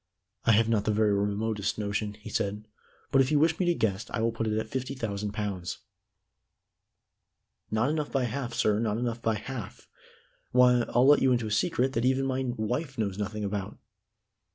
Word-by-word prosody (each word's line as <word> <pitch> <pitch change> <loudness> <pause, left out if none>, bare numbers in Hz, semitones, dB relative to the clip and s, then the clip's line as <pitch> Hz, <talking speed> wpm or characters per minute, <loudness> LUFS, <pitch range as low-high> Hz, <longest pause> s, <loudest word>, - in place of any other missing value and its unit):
"I 115 - +5
have 110 +1 +4
not 110 -3 +1
the 110 - +2
very 105 -1 +3
remotest 105 +1 -1
notion," 105 0 -2
he 110 +1 -10
said. 105 +2 -2 0.4
"But 135 - +5
if 130 - +2
you 150 - +4
wish 160 +2 +3
me 180 - +1
to 175 - +3
guess, 105 -5 -1
I - - -3
will 115 +1 +2
put 115 0 -3
it 110 0 0
at 110 - -2
fifty 130 +3 -4
thousand 105 -4 -3
pounds." 100 -5 -4 1.9
"Not 110 +6 +1
enough 155 -2 -2
by 135 -2 +1
half, 120 0 -3
sir 105 -1 +2
not 110 -2 0
enough 120 -1 -2
by 115 -1 +1
half. 110 -1 -7 0.7
Why, 125 -1 +5
I'll 120 +2 +3
let 145 +1 +6
you 130 - +4
into 120 -2 +1
a 105 - -4
secret 130 +3 +1
that 115 - 0
even 130 +1 +2
my 130 0 -1
wife 130 +6 -2
knows 100 -3 -2
nothing 105 +1 -3
about." 100 0 -3
110 Hz, 195 wpm, -28 LUFS, 105-130 Hz, 1.9 s, let